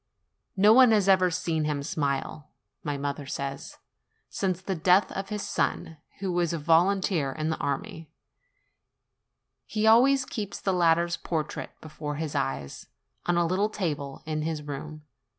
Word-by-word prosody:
No 205 +3 +7
one 255 0 +7
has 210 -3 +3
ever 185 -2 +5
seen 165 -3 -1
him 145 -2 -2
smile, 145 0 -3 0.3
my 145 -1 -2
mother 140 0 -4
says, 140 0 -5 0.5
since 185 -3 -1
the 190 +1 -3
death 180 +3 +3
of 195 0 -5
his 210 -1 -3
son, 160 - -2 0.2
who 195 -1 -3
was 175 -1 0
a - - -1
volunteer 165 -1 +2
in 155 +3 -2
the - - -2
army: 145 +3 -4 1.6
he 215 0 -1
always 255 +4 +5
keeps 205 -5 -5
the 190 - 0
latter's 170 -1 +2
portrait 155 -3 -4
before 150 -1 -6
his 155 -1 -4
eyes, 70 +1 -3 0.4
on 175 0 +2
a 175 - +3
little 190 +5 +1
table 150 -9 -4
in 155 -1 -2
his 155 -1 -3
room. 150 +1 -7
165 Hz, 150 wpm, -27 LUFS, 150-190 Hz, 1.6 s, No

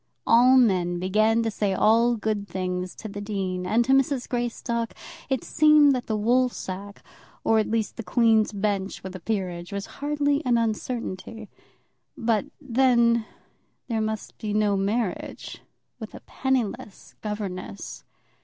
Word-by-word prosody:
All 250 +3 +6
men 180 -8 +3
began 215 +5 +2
to 225 - -1
say 200 -2 -1
all 230 +4 +4
good 215 -2 -2
things 180 -1 -3
to - - -8
the 205 -1 -7
dean, 190 -3 -3
and 230 +5 +2
to 265 - +1
Mrs. 270 -1 +2
Greystock 235 -1 -2 0.3
it 265 -3 0
seemed 300 -2 +5
that 250 -2 -3
the 220 - 0
woolsack, 210 -4 -1 0.4
or 225 0 +3
at 215 - 0
least 225 -1 -1
the 230 - -5
Queen's 220 +2 +3
Bench 200 -1 -2
with 190 0 -7
a - - -6
peerage, 180 -3 -3
was 200 0 -4 0.2
hardly 290 0 +1
an 245 -2 +2
uncertainty. 225 -1 -3 0.7
But 230 -3 +1
then, 235 -4 +3 0.6
there 225 -2 0
must 220 -1 -4
be 210 -1 -3
no 210 -1 +2
marriage 200 0 -3 0.4
with - - -8
a - - -10
penniless 250 -7 -3
governess. 200 -3 -6
220 Hz, 145 wpm, -25 LUFS, 200-240 Hz, 0.7 s, All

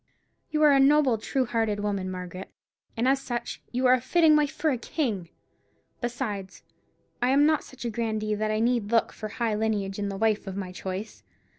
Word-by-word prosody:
"You 305 0 +1
are 300 - +7
a 275 - +5
noble, 275 -4 +4
true 260 +4 0
hearted 225 -3 -1
woman, 200 -2 -2
Margaret; 185 0 -7 0.5
and 235 +3 +1
as 270 0 +3
such 240 -3 -4
you 250 +1 0
are 250 - +7
a 255 - +2
fitting 320 +3 +4
wife 300 -1 +3
for 315 - 0
a 255 - 0
king. 220 - -2 0.7
Besides, 235 -6 -4 0.6
I 245 - +2
am 280 +2 +5
not 310 -1 +2
such 260 -1 -10
a 235 - -1
grandee 215 -2 -1
that 215 +1 -1
I 215 0 0
need 235 -3 +1
look 230 -1 +2
for 215 - -6
high 230 0 -1
lineage 210 -2 -1
in 205 -1 -1
the 195 - -5
wife 215 -1 +1
of 195 0 -5
my 185 -2 -4
choice. 190 +3 -6
225 Hz, 200 wpm, -27 LUFS, 205-260 Hz, 0.7 s, are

